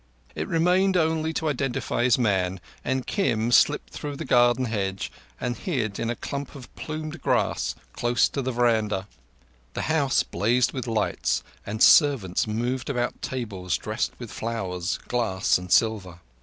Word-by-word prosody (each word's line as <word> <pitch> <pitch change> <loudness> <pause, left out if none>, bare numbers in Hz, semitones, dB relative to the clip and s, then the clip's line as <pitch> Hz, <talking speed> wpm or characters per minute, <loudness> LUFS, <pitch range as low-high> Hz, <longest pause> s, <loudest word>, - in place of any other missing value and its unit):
It - - -4
remained 180 +3 +3
only 160 -1 +1
to 160 - -1
identify 135 -4 -1
his 125 - +4
man, 95 -6 +1 0.2
and 130 0 -1
Kim 115 - 0
slipped - - +3
through 145 -1 -5
the 160 +3 -6
garden 120 0 +4
hedge 100 -4 -2 0.3
and 120 -1 -2
hid 120 - -2
in 115 - -1
a 120 - -1
clump 140 +4 -5
of 130 -4 -12
plumed 155 0 -6
grass - - 0 0.2
close 120 0 +2
to 140 - -3
the 130 0 -2
veranda. 110 -5 +1 0.7
The - - -2
house 140 -5 +2
blazed 120 +3 +1
with 130 -2 -4
lights, 65 - 0 0.2
and 105 +2 0
servants 125 - +5
moved 120 +5 -2
about 120 -3 -2
tables 100 -9 -3
dressed - - -2
with - - -8
flowers, 95 -6 -3
glass, 105 -8 +1
and 90 0 -9
silver. 100 -6 +2
120 Hz, 155 wpm, -25 LUFS, 105-140 Hz, 0.7 s, servants